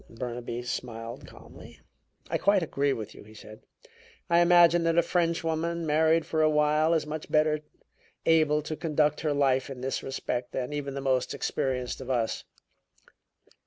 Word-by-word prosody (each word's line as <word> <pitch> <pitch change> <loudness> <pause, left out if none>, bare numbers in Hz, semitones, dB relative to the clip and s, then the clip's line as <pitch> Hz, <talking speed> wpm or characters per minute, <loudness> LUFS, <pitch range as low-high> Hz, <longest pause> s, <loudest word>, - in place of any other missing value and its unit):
Burnaby 120 0 -5
smiled 115 -1 -6
calmly. - - -14 0.5
"I - - -1
quite 200 -2 +3
agree 140 -2 0
with 110 -4 -5
you," - - -13
he 110 +1 -16
said. 110 0 -12 0.7
"I 170 - +5
imagine 175 -1 +5
that 165 0 +1
a 170 - +5
Frenchwoman, 170 -1 -1
married 160 +1 +3
for 160 - 0
a 155 - +4
while, 150 +2 +3
is 155 - 0
much 155 0 -6
better 155 0 +3 0.7
able 155 -2 +3
to 155 - -4
conduct 150 -2 0
her 155 - 0
life 135 -2 +1
in 130 -2 -8
this 135 +1 -2
respect 125 -2 -4
than 130 +2 -3
even 140 -2 -4
the 140 - -4
most 130 -2 0
experienced 125 -1 -2
of 130 - -8
us." 120 -3 -1
150 Hz, 165 wpm, -28 LUFS, 130-160 Hz, 0.7 s, I